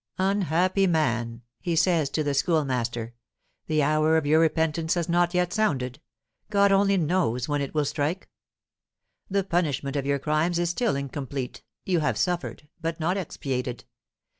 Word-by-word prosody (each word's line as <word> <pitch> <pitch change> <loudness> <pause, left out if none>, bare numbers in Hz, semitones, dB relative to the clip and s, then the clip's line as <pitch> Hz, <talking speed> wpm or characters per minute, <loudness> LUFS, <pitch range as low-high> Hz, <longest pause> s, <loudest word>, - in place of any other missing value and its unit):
"Unhappy 190 0 +2
man," 120 -8 0 0.2
he 175 -3 -2
says 165 -3 +2
to 155 +2 -1
the 145 -1 0
Schoolmaster, 125 -7 0 0.5
"the 155 -1 +2
hour 155 +2 +3
of 160 - 0
your 155 +2 +4
repentance 160 0 +1
has 170 -2 -1
not 175 +1 +2
yet 180 0 +1
sounded. 145 - -1 0.5
God 200 -1 +4
only 195 0 +4
knows 155 -8 0
when 145 -1 0
it 140 +2 -5
will 150 -1 +2
strike. 155 +6 -2 1.0
The 200 0 +1
punishment 155 -6 -1
of 140 -1 -1
your 140 0 +2
crimes 155 +4 0
is 175 0 +1
still 230 - 0
incomplete; 140 -2 -5 0.2
you 180 -3 +2
have 150 - 0
suffered, 175 -4 -2
but 165 0 -3
not 170 +4 0
expiated. 130 - -4
160 Hz, 155 wpm, -26 LUFS, 140-180 Hz, 1.0 s, your